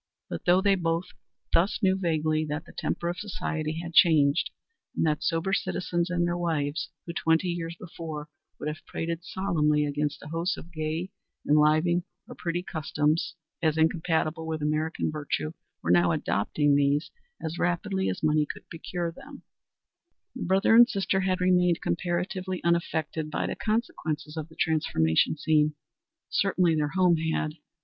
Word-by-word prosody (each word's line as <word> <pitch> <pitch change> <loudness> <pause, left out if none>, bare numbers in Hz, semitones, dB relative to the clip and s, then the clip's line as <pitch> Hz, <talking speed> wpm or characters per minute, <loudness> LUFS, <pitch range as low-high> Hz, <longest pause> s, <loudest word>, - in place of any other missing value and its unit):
But 85 - -5
though 180 +2 +5
they 200 -1 +5
both 170 -1 -1 0.4
thus 185 +5 +3
knew 190 0 +4
vaguely 155 -4 +1
that 155 +2 -4
the - - -14
temper 170 - -2
of 175 +1 -2
society 160 -6 -3
had 170 0 -7
changed, 160 0 +5 0.5
and - - +1
that 150 0 +1
sober 170 +3 0
citizens 175 -2 -1
and 175 -1 +1
their 175 0 0
wives, 160 -3 -1 0.2
who, 170 - -5
twenty 165 +2 +2
years 170 -1 -3
before, 160 -4 -7 0.3
would - - -5
have 150 0 -5
prated 165 +1 -3
solemnly 155 -6 +1
against 145 0 -2
a 150 - -9
host 165 +2 -1
of 170 - -11
gay, 160 +4 -3 0.4
enlivening 155 +4 +4 0.3
or - - -8
pretty 175 +1 -3
customs 155 -1 0 0.3
as 160 -2 +2
incompatible 160 0 +1
with 160 -2 -3
American 155 +1 0
virtue, 145 - -3 0.3
were 85 - +1
now 85 -1 +5
adopting 145 - +1
these 145 +2 +2 0.3
as 160 +2 -4
rapidly 190 +2 0
as 185 - -4
money 150 -1 +3
could - - -15
procure 170 +1 -3
them - - -12 0.9
the - - -6
brother 190 +4 +3
and 240 +1 +8
sister 195 -1 0
had 185 -1 0
remained 180 -2 +3
comparatively 180 +1 -2
unaffected 160 -2 0
by - - -1
the - - -3
consequences 160 -9 -2
of 160 0 -5
the 160 - -16
transformation 150 - +2
scene. 150 -1 +2 0.5
Certainly 185 -4 +2
their 150 -1 +1
home 180 -3 +4
had. 160 -1 -1
165 Hz, 155 wpm, -27 LUFS, 155-175 Hz, 0.9 s, and